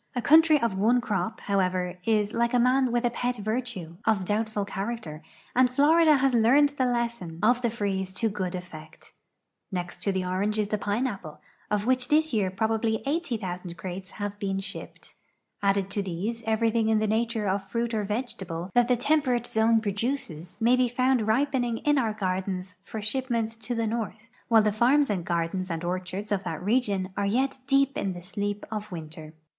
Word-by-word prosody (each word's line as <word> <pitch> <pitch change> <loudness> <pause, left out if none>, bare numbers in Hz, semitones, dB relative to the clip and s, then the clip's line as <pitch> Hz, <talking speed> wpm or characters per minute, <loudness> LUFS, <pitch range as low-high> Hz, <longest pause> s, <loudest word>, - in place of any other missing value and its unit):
A - - 0
country 310 +3 +6
of 230 -6 0
one 235 +5 +4
crop, 220 -1 -2
however, 185 -2 0
is, 215 -2 +1
like 235 +1 +1
a - - +4
man 255 +1 +3
with 240 +1 +1
a 240 - +2
i>et 245 0 -1
virtue, 215 -6 -4
of 200 -4 +1
doul)tful 215 0 -1
character, 195 -6 -5 0.3
and 255 0 +5
Florida 305 +4 +5
has 270 -1 +2
learned 250 +6 +5
the 275 -3 0
lesson 235 -9 -2
of 245 +3 +4
the 240 - +1
freeze 195 -4 -2
to 225 +3 0
good 185 -4 -3
effect. 160 -3 -10 0.6
Next 180 -2 -4
to 200 - +1
the 190 -1 -1
orange 195 +4 -1
is 210 -1 0
the 210 - -1
inneapple, 205 - -2 0.3
of 210 0 0
which 255 0 +2
this 310 -1 +2
year 205 -4 +2
})robably 220 +3 0
80,000 210 - -3
crates 185 +2 -6
have 205 -1 -4
been 195 -1 -1
shipped. 195 +1 -8 0.5
Added 195 -1 +1
to 205 - 0
these, 195 +5 -3
everything 225 0 +2
in 220 - +4
the 215 - +1
nature 220 0 0
of 195 0 -1
fruit 235 +2 -1
or 215 -1 0
vegetable 195 -5 -4
that 245 -1 +4
the 250 -1 +3
temperate 255 -3 +1
zone 225 0 +3
produces 205 - -3
may 235 +2 +4
be 255 0 +3
found 255 -1 +1
ripening 245 0 +1
in 295 +2 +2
our 225 -4 0
gardens 185 -2 -3
for 215 +1 -6
shipment 235 0 -1
to 240 +2 -3
the 230 0 0
north 225 0 -4 0.2
while 225 -2 +5
the 210 - +2
farms 255 +5 +3
and 180 -4 -2
gardens 175 +2 -1
and 165 0 -3
orchards 185 +4 -4
of 200 -1 0
that 160 -1 -5
region 205 -4 +1
are 200 - 0
}'^et 260 +6 0
deep 275 -1 +3
in 195 -1 -1
the 175 -1 -9
sleep 205 +2 -3
of 210 -1 -5
winter. 155 -2 -8
215 Hz, 185 wpm, -27 LUFS, 190-245 Hz, 0.6 s, country